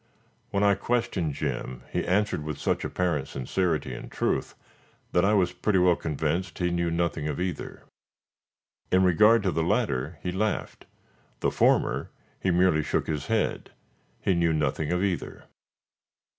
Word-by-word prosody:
When 100 Hz, 0 st, 0 dB
I 100 Hz, 0 st, +5 dB
questioned 105 Hz, -, -1 dB
Jim, 60 Hz, -2 st, -4 dB
he -, -, -1 dB
answered 100 Hz, -4 st, +1 dB
with 75 Hz, -1 st, -4 dB
such -, -, -1 dB
apparent 85 Hz, -7 st, -1 dB
sincerity 80 Hz, +5 st, -1 dB
and -, -, -8 dB
truth, -, -, -1 dB, 0.6 s
that 90 Hz, -, +3 dB
I 105 Hz, +2 st, +4 dB
was 90 Hz, -3 st, +2 dB
pretty 105 Hz, -3 st, +1 dB
well 90 Hz, -1 st, +5 dB
convinced 80 Hz, +4 st, -2 dB
he 90 Hz, -1 st, 0 dB
knew 85 Hz, -1 st, 0 dB
nothing 85 Hz, -2 st, -1 dB
of 75 Hz, 0 st, -3 dB
either. 90 Hz, 0 st, -4 dB, 1.1 s
In 95 Hz, +1 st, +4 dB
regard 105 Hz, +5 st, +5 dB
to 95 Hz, -, +1 dB
the 80 Hz, -, 0 dB
latter 95 Hz, -, 0 dB
he 90 Hz, -, -1 dB
laughed; 105 Hz, +3 st, -2 dB, 0.5 s
the -, -, +1 dB
former -, -, +2 dB, 0.3 s
he 95 Hz, -, 0 dB
merely 90 Hz, -3 st, +3 dB
shook -, -, -1 dB
his 75 Hz, -3 st, -3 dB
head; 110 Hz, -1 st, -1 dB, 0.5 s
he -, -, +1 dB
knew 85 Hz, -2 st, +2 dB
nothing 75 Hz, 0 st, 0 dB
of 90 Hz, +1 st, +1 dB
either. 95 Hz, -3 st, -3 dB
90 Hz, 155 wpm, -27 LUFS, 80-95 Hz, 1.1 s, I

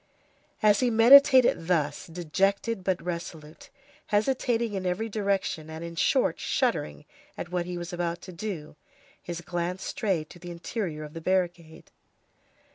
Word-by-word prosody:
As 210 Hz, -1 st, +5 dB
he 250 Hz, -, +2 dB
meditated 245 Hz, -4 st, +7 dB
thus, 150 Hz, -5 st, 0 dB
dejected 190 Hz, +5 st, -1 dB
but 185 Hz, -1 st, 0 dB
resolute, 165 Hz, -3 st, -7 dB, 0.4 s
hesitating 230 Hz, +1 st, 0 dB
in 190 Hz, -2 st, -3 dB
every 205 Hz, +6 st, -1 dB
direction, 195 Hz, -6 st, -1 dB
and, 160 Hz, +1 st, -7 dB
in 170 Hz, 0 st, -7 dB
short, 160 Hz, -, +2 dB
shuddering 75 Hz, -1 st, -1 dB, 0.3 s
at 175 Hz, -, -6 dB
what 175 Hz, -1 st, -1 dB
he 180 Hz, -1 st, -4 dB
was 175 Hz, 0 st, -6 dB
about 175 Hz, -1 st, -2 dB
to 185 Hz, -, -9 dB
do, 175 Hz, -5 st, -6 dB, 0.5 s
his 175 Hz, -1 st, -6 dB
glance 175 Hz, +2 st, -3 dB
strayed 180 Hz, -8 st, -1 dB
to 175 Hz, -, -13 dB
the 175 Hz, +1 st, -9 dB
interior 170 Hz, -2 st, -4 dB
of 150 Hz, 0 st, -9 dB
the 165 Hz, -, -7 dB
barricade. 175 Hz, -3 st, -2 dB
175 Hz, 145 wpm, -27 LUFS, 165-205 Hz, 0.5 s, meditated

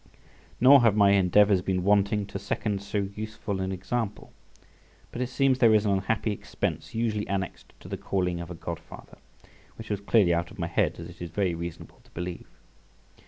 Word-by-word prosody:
Nor 135 Hz, +2 st, +8 dB
have 115 Hz, -3 st, +4 dB
my 100 Hz, -2 st, +5 dB
endeavours 100 Hz, 0 st, +4 dB
been 90 Hz, 0 st, -1 dB
wanting 100 Hz, +1 st, +2 dB
to 100 Hz, 0 st, -6 dB
second 100 Hz, 0 st, -2 dB
so 100 Hz, 0 st, -2 dB
useful 105 Hz, -2 st, -4 dB
an 95 Hz, 0 st, -2 dB
example, 100 Hz, +3 st, -4 dB, 0.8 s
but 120 Hz, -, -5 dB
it 125 Hz, -, -1 dB
seems 135 Hz, -2 st, +2 dB
there 115 Hz, -4 st, +6 dB
is 105 Hz, 0 st, +3 dB
an 100 Hz, -, +2 dB
unhappy 100 Hz, +3 st, 0 dB
expense 105 Hz, -, -4 dB
usually 110 Hz, -2 st, -1 dB
annexed 95 Hz, -1 st, -4 dB
to -, -, -11 dB
the -, -, -4 dB
calling 90 Hz, -3 st, -1 dB
of 85 Hz, -, -8 dB
a 90 Hz, -, -6 dB
godfather, 85 Hz, +1 st, -9 dB, 0.6 s
which 110 Hz, -1 st, -8 dB
was 100 Hz, -1 st, -2 dB
clearly 100 Hz, -4 st, +3 dB
out 85 Hz, +1 st, -1 dB
of 105 Hz, -, -14 dB
my 85 Hz, -, -2 dB
head, 85 Hz, -, 0 dB
as 85 Hz, -, -7 dB
it 90 Hz, 0 st, -13 dB
is 85 Hz, -, -5 dB
very 95 Hz, 0 st, 0 dB
reasonable 85 Hz, 0 st, -8 dB
to -, -, -24 dB
believe. 90 Hz, +1 st, -5 dB
100 Hz, 190 wpm, -27 LUFS, 90-105 Hz, 0.8 s, Nor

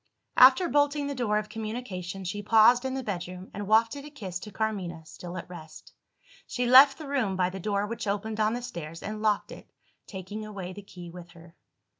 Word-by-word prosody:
After 260 Hz, +8 st, +7 dB
bolting 290 Hz, -1 st, +2 dB
the 285 Hz, -, -3 dB
door 235 Hz, -5 st, 0 dB
of 210 Hz, 0 st, -2 dB
communication, 215 Hz, -4 st, -5 dB
she 205 Hz, +3 st, -4 dB
paused 225 Hz, +4 st, +5 dB
in 265 Hz, 0 st, -2 dB
the 265 Hz, -, -3 dB
bedroom, 180 Hz, -2 st, -6 dB
and 205 Hz, -1 st, -5 dB
wafted 230 Hz, +6 st, +3 dB
a 295 Hz, -, -9 dB
kiss 195 Hz, -11 st, -6 dB
to 210 Hz, -, -9 dB
Carmina, 190 Hz, -6 st, -3 dB
still 175 Hz, +3 st, -9 dB
at 170 Hz, -, -7 dB
rest. 160 Hz, -3 st, -12 dB, 0.5 s
She 245 Hz, -, -2 dB
left 270 Hz, +3 st, +8 dB
the 310 Hz, -, -8 dB
room 250 Hz, -9 st, 0 dB
by 185 Hz, -1 st, +1 dB
the 190 Hz, -, -7 dB
door 200 Hz, +1 st, -1 dB
which 230 Hz, 0 st, -5 dB
opened 210 Hz, +2 st, -2 dB
on 215 Hz, +1 st, +2 dB
the 245 Hz, -, -5 dB
stairs, 165 Hz, -6 st, -7 dB
and 215 Hz, +1 st, -5 dB
locked 210 Hz, -2 st, +1 dB
it, -, -, -11 dB, 0.4 s
taking 200 Hz, +2 st, -7 dB
away 195 Hz, -4 st, -7 dB
the 205 Hz, -, -9 dB
key 180 Hz, -3 st, -11 dB
with 175 Hz, 0 st, -11 dB
her. 165 Hz, -1 st, -16 dB
210 Hz, 205 wpm, -28 LUFS, 180-240 Hz, 0.5 s, left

